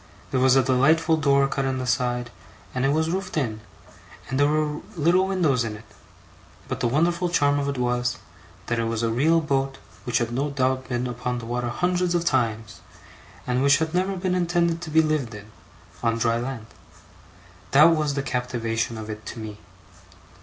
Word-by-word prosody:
There 130 - +1
was 130 0 +5
a 135 - +5
delightful 155 +6 +3
door 140 -3 +3
cut 135 0 -2
in 130 -1 -1
the 130 - -3
side, 120 0 -1 0.4
and 125 +1 0
it - - +3
was 160 +2 +1
roofed 185 -1 -3
in, 110 -7 -2 0.7
and 130 +2 -2
there 145 - +5
were 150 0 0
little 175 +4 +3
windows 160 -10 +1
in 110 -2 -4
it; 105 - -13 0.8
but - - -4
the - - +1
wonderful 170 +7 +1
charm 145 -4 +2
of 140 0 -1
it 140 - -3
was, 125 0 0 0.5
that 120 -1 -1
it 115 - 0
was 115 0 -2
a 115 - +1
real 160 +8 +3
boat 135 -3 -1 0.3
which 120 0 +1
had 120 -1 -1
no 135 +5 -1
doubt 130 -1 -1
been 125 0 -1
upon 125 0 -3
the 120 - -6
water 120 +1 -2
hundreds 180 +6 0
of 170 0 0
times, 115 -7 -1 0.6
and 125 0 0
which 140 +1 +5
had 160 0 -2
never 185 +2 0
been 180 0 -1
intended 170 -1 +1
to 170 - -6
be 160 +1 +4
lived 150 -8 -1
in, 105 +1 -11 0.5
on 115 -1 +1
dry 115 0 +1
land. 120 -2 -5 1.0
That 155 +4 +6
was 150 -2 -1
the 140 - -1
captivation 115 -3 -2
of 110 -1 -7
it 105 -1 -7
to 115 - -7
me. 105 -1 -7
135 Hz, 195 wpm, -24 LUFS, 120-160 Hz, 1.0 s, That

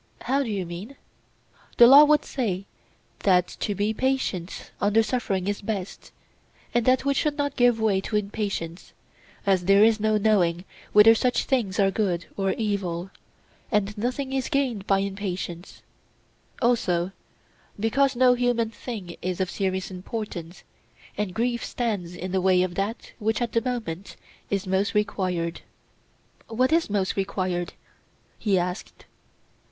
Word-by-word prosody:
How 275 +2 +1
do 260 - -3
you 195 -4 -2
mean? 180 +10 -8 0.8
The 240 - +9
law 280 +5 +9
would 300 0 +3
say 200 -8 -2 0.5
that 180 -3 +3
to 205 - -2
be 205 +3 0
patient 255 -8 -2
under 210 +2 +3
suffering 210 -5 -1
is 205 0 -2
best, 200 -2 -5 0.6
and 240 0 +1
that 255 +1 +3
we 280 - +3
should 295 +1 0
not 285 -1 -1
give 245 -2 +3
way 205 -3 +2
to 210 - -4
impatience, 200 -5 -3 0.5
as 190 -3 +2
there 195 +2 +6
is 220 0 +4
no 215 0 +2
knowing 190 -5 +2 0.3
whether 210 +2 +8
such 245 +2 +1
things 220 -9 -1
are 195 -1 +4
good 185 -5 -1
or 195 -1 0
evil; 195 -4 -2 0.6
and 210 -1 0
nothing 255 +5 -3
is 265 -1 -1
gained 250 -8 -1
by 195 - +4
impatience; 190 -3 -5 0.8
also, 185 -7 +1 0.7
because 265 +5 +2
no 250 0 +5
human 245 -2 0
thing 210 -7 -7
is 185 0 -3
of 185 -2 -1
serious 190 -1 -2
importance, 180 -3 -6 0.5
and 205 -3 -3
grief 235 +1 0
stands 200 -8 -3
in 185 +1 -5
the 190 0 +1
way 185 -1 +4
of 185 -1 -3
that 200 +5 -3
which 220 0 0
at 240 -1 -2
the 230 - +1
moment 220 -8 -4 0.3
is 200 -1 -1
most 190 +2 0
required. 185 -5 -1 0.9
What 255 +4 +1
is 330 -5 +2
most 200 -2 0
required? 185 -3 -2 0.7
he 200 -4 +2
asked. 180 +2 -4
205 Hz, 145 wpm, -25 LUFS, 185-235 Hz, 0.9 s, The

